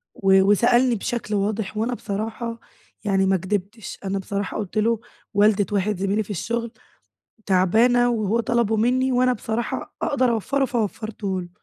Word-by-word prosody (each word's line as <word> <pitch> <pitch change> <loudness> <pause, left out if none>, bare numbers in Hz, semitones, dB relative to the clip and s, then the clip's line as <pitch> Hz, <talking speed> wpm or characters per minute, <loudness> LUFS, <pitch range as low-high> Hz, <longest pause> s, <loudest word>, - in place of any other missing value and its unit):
و 195 -1 +4
وسألني 240 +5 +4
بشكل 220 0 -3
واضح، 205 +1 -2
وأنا 230 +3 0
بصراحة 225 +2 -4 0.5
يعني 195 -1 +2
ما 190 0 +3
كدبتش. 205 +4 -4
أنا 195 0 -1
بصراحة 200 +1 -3
قُلت 210 0 -5
له: 225 +1 +2 0.3
"والدة 205 0 +4
واحد 205 0 0
زميلي 200 +3 0
في 205 - -20
الشغل 230 +5 -3 0.7
تعبانة، 225 +6 +4
وهو 225 -1 0
طلبه 235 -1 +1
منّي، 255 +4 +2
وأنا 250 0 +3
بصراحة 225 0 -4
أقدر 260 -3 +1
أوفّر، 270 +5 0
ه - - +4
فوفّرته 215 -4 -3
له." 175 - -9
215 Hz, 150 wpm, -23 LUFS, 200-235 Hz, 0.7 s, و